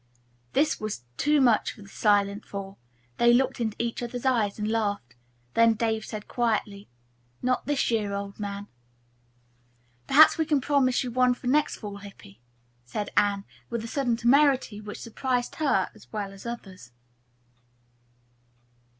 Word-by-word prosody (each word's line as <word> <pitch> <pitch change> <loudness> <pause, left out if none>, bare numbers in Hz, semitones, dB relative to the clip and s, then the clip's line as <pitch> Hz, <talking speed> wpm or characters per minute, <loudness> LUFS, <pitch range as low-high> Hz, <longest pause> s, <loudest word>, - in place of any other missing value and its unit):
This 295 +2 +2
was 215 - -4
too 295 - +2
much 240 -5 +3
for 210 - -14
the - - -14
silent 205 0 +1
four. 195 -1 -7 0.4
They 235 0 +5
looked 255 +2 +2
into 220 -2 -1
each 235 0 -2
other's 245 +1 -5
eyes 225 -6 +1
and 210 0 -2
laughed. 205 - -1 0.4
Then 230 -1 +5
Dave 220 -1 -1
said 215 -2 -7
quietly, 215 -4 -1 0.5
"Not 255 +1 0
this 290 -4 +1
year, 210 -3 0
old 200 0 -5
man." 200 0 -5 1.4
"Perhaps 310 +3 +7
we 320 - +2
can 295 -2 +3
promise 265 -2 +2
you 250 - -4
one 250 0 +3
for 250 - -15
next 290 +4 +2
fall, 205 -2 -7
Hippy," 195 - -13 0.4
said 200 +13 -4
Anne, 200 -1 +2 0.2
with 235 -1 -3
a - - -5
sudden 245 -2 0
temerity 255 -3 +3
which 210 0 -8
surprised 245 +1 -2
her 270 -12 +1
as 120 +3 -18
well 200 -2 -4
as 195 - -13
the 235 - -2
others. 185 - -12
225 Hz, 155 wpm, -27 LUFS, 200-250 Hz, 1.4 s, Perhaps